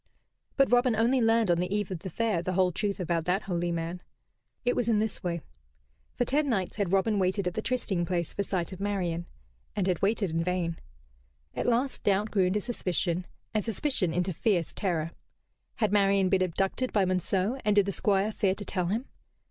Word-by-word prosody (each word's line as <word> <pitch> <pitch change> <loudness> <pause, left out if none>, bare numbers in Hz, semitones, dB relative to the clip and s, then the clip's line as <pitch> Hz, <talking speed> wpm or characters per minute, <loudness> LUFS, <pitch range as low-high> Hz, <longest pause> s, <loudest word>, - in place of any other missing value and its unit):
But 275 -2 +4
Robin 245 -1 +4
only 240 +4 +3
learned 225 -3 +3
on 170 - +2
the 180 +1 -1
eve 205 -2 -1
of 180 - -3
the 190 - -6
Fair 215 -1 0
the 185 +2 -2
whole 185 0 +3
truth 200 +3 -2
about 170 -2 -1
that 185 +3 +1
holy 175 -2 -1
man. 170 +1 -3 0.6
It 245 - +2
was 235 -1 0
in 220 - +4
this 215 0 -1
way. 170 -2 -2 0.7
For 245 - +1
ten 290 +2 +1
nights 195 -6 -1
had 200 -4 0
Robin 200 +2 +2
waited 190 +1 +1
at 180 - -1
the 220 - -2
trysting 215 -8 -1
place 170 -2 -2
for - - -1
sight 185 -2 -2
of 185 - -9
Marian; 180 -4 -2 0.5
and 200 - 0
had 180 -3 0
waited 200 -2 +1
in 165 +1 0
vain. 175 -2 -1 0.8
At - - -2
last 245 +3 +1
doubt 205 +2 +1
grew 195 -3 +3
into 195 +3 +1
suspicion, 180 -6 -1 0.3
and 215 -2 +1
suspicion 225 - -1
into 180 +2 0
fierce 175 -2 0
terror. 165 -4 -1 0.6
Had 215 -4 +1
Marian 195 -2 +4
been 190 0 +3
abducted 195 +8 0
by 200 -3 +3
Monceux, 185 +6 0
and 210 -1 +2
did 205 -2 +5
the 200 - -1
Squire 200 +2 +1
fear 195 -3 +1
to 205 - -6
tell 180 -2 -1
him? 220 +8 -1
195 Hz, 205 wpm, -28 LUFS, 180-215 Hz, 0.8 s, did